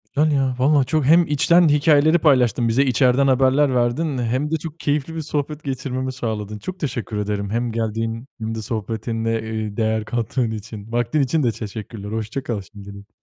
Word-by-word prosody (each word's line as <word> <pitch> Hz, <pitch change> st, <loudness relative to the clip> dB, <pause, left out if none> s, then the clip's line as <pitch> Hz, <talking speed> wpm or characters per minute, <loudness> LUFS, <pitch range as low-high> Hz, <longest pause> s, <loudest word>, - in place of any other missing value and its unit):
Yani, 150 Hz, +1 st, +3 dB
ya, 135 Hz, -2 st, +1 dB
valla 140 Hz, +1 st, +4 dB
çok 155 Hz, +1 st, 0 dB
hem 170 Hz, +3 st, +5 dB
içten 170 Hz, +3 st, +4 dB
hikâyeleri 150 Hz, +2 st, +4 dB
paylaştın 125 Hz, -6 st, +3 dB
bize 130 Hz, +5 st, +3 dB
içeriden 130 Hz, +1 st, +3 dB
haberler 135 Hz, +1 st, +3 dB
verdin 130 Hz, +4 st, 0 dB
hem 130 Hz, +6 st, -1 dB
de 160 Hz, -, +2 dB
çok 160 Hz, +1 st, -8 dB
keyifli 150 Hz, +2 st, -1 dB
bir 160 Hz, -, -3 dB
sohbet 150 Hz, 0 st, -3 dB
geçirmemi 130 Hz, -1 st, -3 dB
sağladın. 105 Hz, -4 st, -4 dB
Çok 185 Hz, -, -7 dB
teşekkür 120 Hz, -, -3 dB
ederim 100 Hz, -1 st, -2 dB
hem 120 Hz, +1 st, -1 dB
geldiğin 115 Hz, +2 st, -3 dB
hem 115 Hz, 0 st, -3 dB
de 110 Hz, -, -4 dB
sohbetinle, 115 Hz, 0 st, -3 dB, 0.3 s
ııı, 105 Hz, 0 st, -6 dB
değer 110 Hz, -1 st, 0 dB
kattığın 120 Hz, 0 st, -1 dB
için. 110 Hz, 0 st, -8 dB
Vaktin 120 Hz, +5 st, +1 dB
için 140 Hz, +3 st, +1 dB
de 120 Hz, -, +2 dB
teşekkürler, 105 Hz, -1 st, -7 dB
hoşça 110 Hz, +4 st, -3 dB
kal 110 Hz, -4 st, -3 dB
şimdilik. 100 Hz, 0 st, -12 dB
125 Hz, 175 wpm, -21 LUFS, 110-145 Hz, 0.3 s, hem